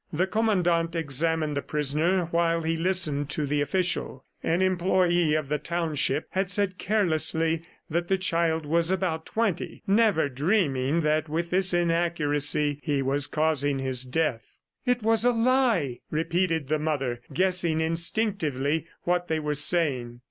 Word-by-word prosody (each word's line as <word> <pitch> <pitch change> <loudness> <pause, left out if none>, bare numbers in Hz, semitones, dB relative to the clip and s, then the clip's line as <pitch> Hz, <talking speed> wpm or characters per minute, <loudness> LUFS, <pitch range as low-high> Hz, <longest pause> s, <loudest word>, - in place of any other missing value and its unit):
The 175 +3 +1
Commandant 180 -6 0
examined 160 0 0
the 140 - -1
prisoner 150 +6 0
while 165 0 +1
he 165 +1 0
listened 165 -5 0
to 150 0 -1
the 145 +1 0
official. 170 -3 -1 0.2
An 170 +3 0
employee 175 -3 +2
of 155 -2 -2
the 150 +1 -1
township 155 -3 -1
had 190 -1 -1
said 195 -1 0
carelessly 165 -5 +1 0.3
that 170 +2 -2
the 190 - +1
child 165 -3 0
was 165 +3 +1
about 180 -4 -2
twenty, 215 -6 -2
never 205 -6 +3
dreaming 145 - 0
that 155 0 0
with 170 +2 -3
this 185 0 +3
inaccuracy 150 -4 +1
he 145 -3 -1
was 140 +2 0
causing 150 -3 0
his 130 -1 0
death. 130 -3 -3 0.3
"It 245 -2 +1
was 225 0 +4
a 245 0 +3
lie!" 230 - +1
repeated 165 -1 -1
the 155 +2 0
mother 135 -6 -2
guessing 180 -3 +1
instinctively 160 - 0 0.2
what 175 0 0
they 160 -2 -1
were 150 -1 -2
saying. 140 -6 0
165 Hz, 145 wpm, -26 LUFS, 150-180 Hz, 0.3 s, was